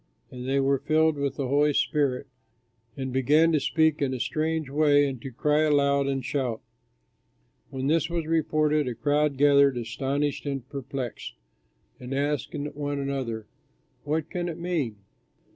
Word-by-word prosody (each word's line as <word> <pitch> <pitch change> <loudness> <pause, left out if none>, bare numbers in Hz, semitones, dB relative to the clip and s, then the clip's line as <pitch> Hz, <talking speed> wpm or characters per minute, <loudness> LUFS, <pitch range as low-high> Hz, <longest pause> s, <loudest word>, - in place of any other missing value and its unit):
And 125 -1 -7
they 135 +1 +2
were 135 0 +2
filled 155 +2 +2
with 140 -1 -2
the 140 -3 -2
Holy 145 +2 +3
Spirit 140 -3 +1 0.7
and 130 -2 -4
began 150 +5 +4
to 155 - +3
speak 160 +2 +2
in 130 -2 0
a - - -5
strange 155 +2 -1
way 145 0 +3
and 130 -4 -5
to 135 - -6
cry 150 +4 +1
aloud 140 -2 +3
and 135 -2 -2
shout. 125 -6 -2 1.1
When 130 -1 -4
this 155 +2 +2
was 170 -2 -2
reported 155 -2 +1
a 125 - -3
crowd 145 +3 +1
gathered, 140 -2 +5
astonished 135 +5 -2
and 135 -3 -4
perplexed, 135 -3 -6 0.6
and 125 +1 -5
asked 145 -2 -1 0.2
one 145 0 -3
another, 135 -6 -3 0.6
"What 155 +1 -2
can 175 -1 -2
it 165 - -6
mean?" 165 -10 -2
140 Hz, 155 wpm, -26 LUFS, 135-150 Hz, 1.1 s, gathered